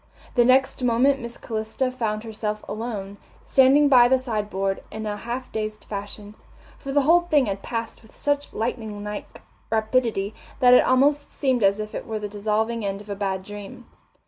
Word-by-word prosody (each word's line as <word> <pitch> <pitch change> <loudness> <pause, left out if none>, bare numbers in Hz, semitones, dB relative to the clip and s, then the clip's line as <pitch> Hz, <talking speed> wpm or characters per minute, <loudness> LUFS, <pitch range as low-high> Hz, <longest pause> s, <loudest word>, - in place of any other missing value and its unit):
The 240 - +5
next 260 +1 +3
moment 250 +3 +3
Miss 235 0 -7
Calista 225 +3 -2
found 220 -4 -2
herself 215 -1 -4
alone, 210 -3 -5 0.3
standing 275 +2 +5
by 250 -3 +7
the 260 +1 +4
sideboard 210 -6 -2
in 220 0 -5
a 210 -1 -2
half 240 +4 -5
dazed 215 -1 -4
fashion, 205 0 -7 0.5
for 275 - -6
the 285 0 +3
whole 335 +5 +5
thing 305 -6 +2
had 195 -2 -3
passed 230 -1 -5
with 220 - -19
such 290 0 -1
lightning 220 -3 -4
like 210 0 -7 0.3
rapidity 220 -2 0 0.3
that 250 -2 +6
it 250 - +7
almost 285 +3 +3
seemed 260 -4 0
as 200 0 +4
if 215 0 -6
it - - -6
were 220 - -3
the 210 -1 -4
dissolving 215 +2 -1
end 195 0 -2
of 205 0 -10
a - - -2
bad 190 -2 -2
dream. 205 +5 -9
225 Hz, 180 wpm, -24 LUFS, 210-255 Hz, 0.5 s, by